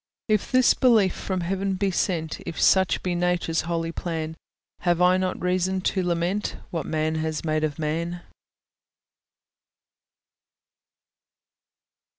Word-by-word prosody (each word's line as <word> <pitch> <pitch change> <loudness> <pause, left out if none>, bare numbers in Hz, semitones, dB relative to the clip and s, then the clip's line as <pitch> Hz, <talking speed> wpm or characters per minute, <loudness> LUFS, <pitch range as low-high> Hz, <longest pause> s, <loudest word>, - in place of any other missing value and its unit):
If 215 -3 +1
this 255 -1 +5
belief 220 -7 +4
from 185 -2 -3
heaven 195 +2 -1
be 195 +1 0
sent, 165 -3 -1
If 165 - -6
such 190 -1 +3
be 180 - -1
Nature's 175 -2 0
holy 165 -1 -1
plan, 160 -2 -4 0.4
Have 175 -1 +1
I 180 +1 +5
not 185 0 -1
reason 185 +1 0
to 190 +1 0
lament 175 +3 -1
What 165 -4 -3
man 155 0 0
has 155 0 -3
made 155 0 0
of 155 0 -1
man? 170 +3 -3
175 Hz, 125 wpm, -25 LUFS, 165-190 Hz, 0.4 s, this